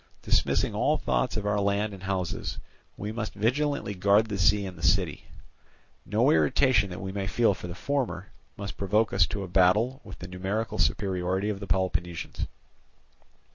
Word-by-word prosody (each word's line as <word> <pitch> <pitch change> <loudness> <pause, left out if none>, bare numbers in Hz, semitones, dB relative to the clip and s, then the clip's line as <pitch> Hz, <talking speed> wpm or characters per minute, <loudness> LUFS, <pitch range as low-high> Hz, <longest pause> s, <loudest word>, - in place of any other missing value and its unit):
Dismissing - - +1
all - - +2
thought - - 0
of 105 - -3
our 105 0 +1
land 100 +1 0
and 95 - -10
houses, 95 -2 -3 0.4
we 105 +2 -4
must 110 -1 -4
vigilantly 130 +2 0
guard 100 +3 +3
the 100 - -2
sea 100 +2 +3
and 95 -1 -7
the - - -12
city. - - +1 0.8
No - - +3
irritation 100 - +3
that 90 0 -7
we 95 0 -5
may 100 0 -3
feel 115 0 +3
for 90 - -8
the 85 - -7
former 100 -4 -2 0.3
must 100 0 -6
provoke 105 +3 +1
us 85 - +4
to 100 - -4
a - - -5
battle 105 +9 +3
with - - -10
the 90 - -8
numerical 95 +5 -3
superiority 95 0 0
of 100 -2 -3
the 100 - -7
Peloponnesians. 85 -1 -2
100 Hz, 175 wpm, -27 LUFS, 90-105 Hz, 0.8 s, us